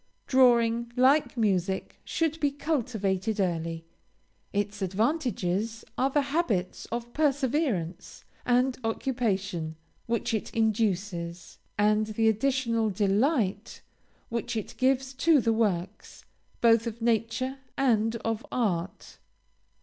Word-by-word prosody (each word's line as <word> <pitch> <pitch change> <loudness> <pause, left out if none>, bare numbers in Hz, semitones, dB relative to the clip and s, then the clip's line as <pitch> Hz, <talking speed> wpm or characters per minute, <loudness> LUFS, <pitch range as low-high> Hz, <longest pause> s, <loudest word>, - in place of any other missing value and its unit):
Drawing, 235 -2 +3
like 265 +2 +3
music, 190 -4 0
should 325 -1 -1
be 290 - +2
cultivated 225 - -1
early. 165 -3 -1 0.7
Its 205 0 -2
advantages 220 - -1
are 265 - +2
the 285 +1 +2
habits 215 - -1
of 240 0 -5
perseverance 270 - -1 0.2
and 250 +1 +2
occupation, 200 -9 -1 0.3
which 235 -1 -1
it 220 - -2
induces; 195 -6 -1 0.2
and 210 +1 +3
the 220 +1 +1
additional 230 -1 +1
delight 205 - 0 0.5
which 235 0 -3
it 215 - -5
gives 265 0 +1
to 305 +3 +4
the 230 -2 +2
works, 200 -3 -2 0.4
both 230 0 +4
of 230 0 -5
nature 235 +4 0 0.2
and 225 -4 +2
of 225 0 -1
art. 190 -7 -2
225 Hz, 105 wpm, -28 LUFS, 200-255 Hz, 0.7 s, to